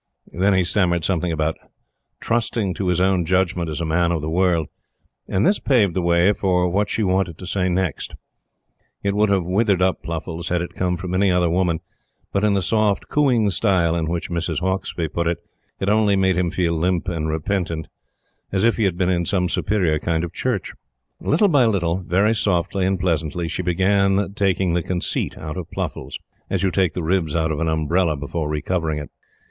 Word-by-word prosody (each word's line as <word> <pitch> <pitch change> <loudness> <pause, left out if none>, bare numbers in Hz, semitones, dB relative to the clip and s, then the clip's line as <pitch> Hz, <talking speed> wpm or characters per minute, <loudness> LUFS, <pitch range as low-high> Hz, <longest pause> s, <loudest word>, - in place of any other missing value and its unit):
Then 95 +3 +2
he 95 - +3
stammered 85 -2 +1
something 90 -2 0
about 80 0 -1 0.6
"trusting 115 -4 -1
to 95 +2 -3
his 90 -1 +1
own 95 -1 +2
judgment 90 -1 0
as 80 +2 -4
a - - -1
man 85 +2 +1
of 80 -3 -1
the 80 - -3
world;" 90 -2 +2 0.6
and 95 +3 +1
this 205 - +3
paved 110 -10 +2
the 95 - 0
way 85 +3 +3
for 90 -3 +1
what 100 +4 0
she 110 - 0
wanted 95 -4 0
to 90 - -9
say 95 0 0
next. 90 -2 -2 0.9
It 100 0 +1
would 105 0 +3
have 95 -2 +2
withered 100 +1 +2
up 95 0 +1
Pluffles 85 0 -5
had 90 -1 0
it 85 - -7
come 90 -1 -1
from 90 +1 -5
any 95 +1 +3
other 90 -2 +2
woman; 85 -2 +1 0.5
but 100 - +1
in 105 -1 +3
the 95 - +1
soft 105 -2 +1
cooing 125 -8 +2
style 90 -3 +2
in 80 -2 -1
which 85 +1 -3
Mrs. 85 -2 -1
Hauksbee 95 -2 -2
put 85 +2 -2
it, 85 -1 0 0.4
it 95 - -2
only 105 -1 +3
made 95 -1 +2
him 90 -1 +1
feel 85 -1 0
limp 90 +2 0
and 80 -3 -2
repentant 80 0 -2 0.6
as 95 0 0
if 115 0 +3
he 110 - +2
had 90 -3 0
been 90 -1 +1
in 85 -1 +1
some 90 -3 +1
superior 90 -4 0
kind 80 +1 -1
of 85 - -5
church. - - -2 0.5
Little 170 +8 +2
by 145 -9 +4
little, 90 -5 +1
very 95 +4 +1
softly 95 -2 0
and 95 -1 0
pleasantly, 85 -1 -1
she 85 - -3
began 95 +2 +1
taking 95 -4 +1
the 85 - +1
conceit 90 +1 -2
out 80 +2 -6
of 90 -2 -6
Pluffles, - - -5 0.3
as 95 -1 -1
you 95 - +2
take 90 -3 +1
the 90 - -3
ribs 85 -2 0
out 80 -1 +1
of 75 - -2
an 85 - 0
umbrella 80 +1 +1
before 75 +2 -3
re 75 -1 -2
covering 80 -4 -1
it. 75 -1 -7
90 Hz, 205 wpm, -21 LUFS, 85-95 Hz, 0.9 s, by